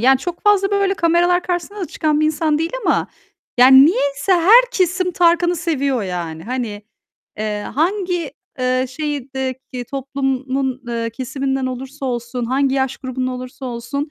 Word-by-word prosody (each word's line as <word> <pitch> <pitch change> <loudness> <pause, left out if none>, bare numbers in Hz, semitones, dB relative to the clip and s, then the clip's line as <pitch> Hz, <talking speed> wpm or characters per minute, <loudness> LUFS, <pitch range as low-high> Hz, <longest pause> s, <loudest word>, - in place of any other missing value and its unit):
yani, 265 +3 +5
çok 345 +4 -6
fazla 405 -2 +3
böyle 400 -1 +1
kameralar 350 0 +2
karşısında 355 +3 -3
da 365 - -2
çıkan 305 -2 0
bir 310 - +3
insan 310 0 +1
değil 325 +1 -1 0.2
ama - - +2 0.5
yani 260 +2 +8
niyeyse 295 - +1
her 380 +8 +7
kesim 370 -3 +1
Tarkan'ı 345 0 +3
seviyor 280 -7 -1
yani. 170 -4 -5
Hani, 235 -4 -4 0.6
eee, 210 -1 -2
hangi, 355 -1 0 0.3
eee, 255 0 +1
şehirdeki 265 -3 -4
toplumun, 270 -1 -2
eee, 230 -1 -2
kesiminden 265 +2 -2
olursa 265 +2 -6
olsun, 240 0 -3
hangi 265 +2 +1
yaş 265 -1 0
grubundan 255 -1 -3
olursa 255 +1 -8
olsun, 250 +5 -4
275 Hz, 145 wpm, -19 LUFS, 255-340 Hz, 0.6 s, yani